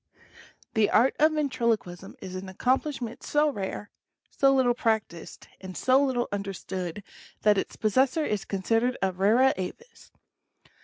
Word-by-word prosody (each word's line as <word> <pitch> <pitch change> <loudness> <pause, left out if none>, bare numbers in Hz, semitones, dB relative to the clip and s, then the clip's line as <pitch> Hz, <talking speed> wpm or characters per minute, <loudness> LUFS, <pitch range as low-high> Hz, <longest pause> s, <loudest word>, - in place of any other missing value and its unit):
SJHE 220 -3 +3
Art 245 +5 +4
of 310 +1 +4
Ventriloquism 235 - -2
is 185 - -7
an 185 +1 -6
accomplishment 250 +3 -1
so 300 +1 +2
rare, 205 -1 -5 0.4
so 275 -1 +3
{J 270 - +3
little 250 -2 +3
practiced, 220 -8 -3
and 185 -1 -8
so 260 +2 +3
little 250 -3 0
understood, 195 -2 -5 0.4
that 210 -2 +4
its - - -5
possessor 260 +8 +1
is 210 -2 -2
considered 225 +6 0
a 190 - +2
rara 215 +9 +3
avis. 325 - -8
225 Hz, 140 wpm, -27 LUFS, 195-260 Hz, 0.4 s, Art